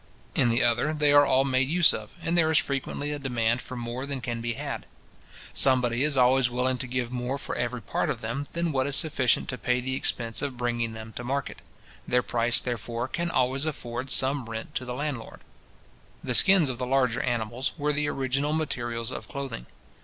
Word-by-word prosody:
In 120 - +3
the 115 +1 +2
other, 120 +6 +2
they 150 -1 +3
are 145 0 +7
all 135 +1 +4
made 130 0 +2
use 170 +1 +5
of, - - -6
and 165 - 0
there 165 -2 +4
is 160 - +4
frequently 140 +1 -1
a 145 - -3
demand 120 -3 0
for 130 - -8
more 120 +3 -4
than 140 -2 -3
can 120 -2 -4
be 120 0 -2
had. - - -5 0.7
Somebody 125 -1 +3
is 150 -2 +1
always 125 0 +4
willing 125 +1 0
to 130 - -3
give 125 -1 -2
more 125 +2 -2
for 140 - -5
every 120 -1 -2
part - - -1
of - - -2
them, 120 +6 -4
than 170 -1 0
what 135 -1 +1
is 140 - 0
sufficient 140 -5 +2
to 125 - -3
pay 125 +3 +1
the 130 +1 -3
expense 115 -3 -1
of 140 -4 -3
bringing 120 -2 -1
them 110 0 -9
to 120 - -4
market. 135 +2 -3 0.5
Their 125 0 +2
price, 120 0 +2
therefore, 120 0 -3
can 170 +4 -2
always 130 +1 +1
afford 130 -3 -4
some 130 -2 0
rent 115 +6 -6
to 130 - -3
the 125 0 -4
landlord. 140 -4 -4 0.8
The - - -1
skins 185 -8 +6
of 125 - -8
the 125 - -2
larger 125 -2 +2
animals 120 0 -1
were 150 0 0
the 150 0 0
original 135 +2 -1
materials 120 -6 -2
of - - -7
clothing. 135 - -6
130 Hz, 205 wpm, -27 LUFS, 120-140 Hz, 0.8 s, are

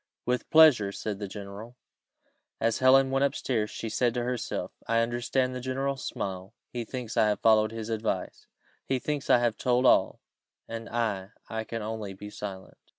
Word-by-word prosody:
"With 125 -1 -1
pleasure," 145 -11 +6
said 100 0 -4
the 100 - -4
general. 100 +4 -9 0.8
As 115 0 +1
Helen 135 +1 +5
went 135 +1 +2
up 140 - +1
stairs, 110 -5 -1
she 115 - -5
said 120 +2 +1
to 120 - 0
herself, 125 -1 -3 0.2
"I 115 0 +3
understand 120 +2 0
the 125 - -5
general's 135 +1 -2
smile; 95 +2 -5 0.2
he 120 -1 -3
thinks 120 -2 -6
I 110 - +5
have 105 - 0
followed 110 -1 +4
his 115 -1 -6
advice; 110 -1 -3 0.4
he 135 - 0
thinks 145 +2 -3
I - - +7
have 120 -2 0
told 125 0 +2
all - - +4 0.5
and 115 0 -6
I 110 -4 -2 0.2
I 110 -1 -3
can 115 0 -5
only 110 -2 -4
be 105 +2 -9
silent." 95 -3 -8
115 Hz, 180 wpm, -28 LUFS, 105-125 Hz, 0.8 s, I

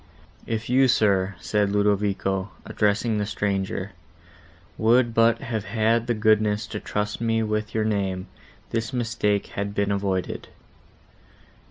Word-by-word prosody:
"If 115 0 -2
you, 130 +2 +4
sir," 100 -5 +2
said 105 -2 0
Ludovico, 100 -1 0 0.2
addressing 105 +1 +1
the 105 - 0
stranger, 100 -1 -2 0.8
"would 115 +1 +3
but 115 0 +3
have 110 -4 -3
had 115 +3 +1
the 120 - +1
goodness 110 0 +2
to 105 - -2
trust 105 +2 -3
me 115 -1 +1
with 110 0 -2
your 110 -1 +1
name, 95 -3 -1 0.5
this 115 0 -2
mistake 110 -4 0
had 100 0 -3
been 100 -1 +1
avoided." 95 -2 -2
105 Hz, 130 wpm, -24 LUFS, 100-115 Hz, 0.8 s, you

